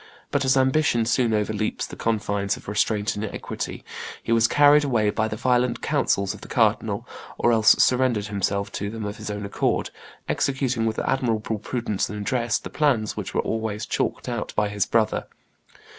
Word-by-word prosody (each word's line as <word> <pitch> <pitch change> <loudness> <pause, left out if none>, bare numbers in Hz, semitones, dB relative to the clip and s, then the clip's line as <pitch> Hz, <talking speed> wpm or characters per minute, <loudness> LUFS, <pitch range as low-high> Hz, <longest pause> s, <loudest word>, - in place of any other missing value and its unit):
But - - +1
as 130 +1 +3
ambition 130 -3 +3
soon 120 0 +2
overleaps 105 0 -1
the - - -9
confines 100 -3 -1
of - - -15
restraint 105 0 0
and 105 - -4
equity, 105 - -6 0.4
he - - -3
was 115 -1 +5
carried 145 +2 +6
away 115 -7 +2
by 110 +1 0
the 110 - -4
violent 125 +1 +1
counsels 100 -1 +1
of - - -12
the - - -10
cardinal, - - +1 0.3
or 120 - +3
else 110 -2 +6
surrendered 125 -5 +3
himself 100 -1 -1
to 100 - -3
them 110 0 -5
of 105 +1 -5
his 110 -1 -6
own 105 0 -4
accord, 100 - -1 0.4
executing 130 -4 0
with 110 - -2
admirable 115 -4 -1
prudence 110 -2 -2
and 105 - -5
address 120 +2 0
the - - -9
plans 130 -8 +1
which - - -5
were - - +3
always 110 0 -3
chalked - - -2
out 120 -3 -3
by 105 -1 +1
his 100 -2 -1
brother." 110 -2 +1
110 Hz, 180 wpm, -24 LUFS, 105-125 Hz, 0.4 s, carried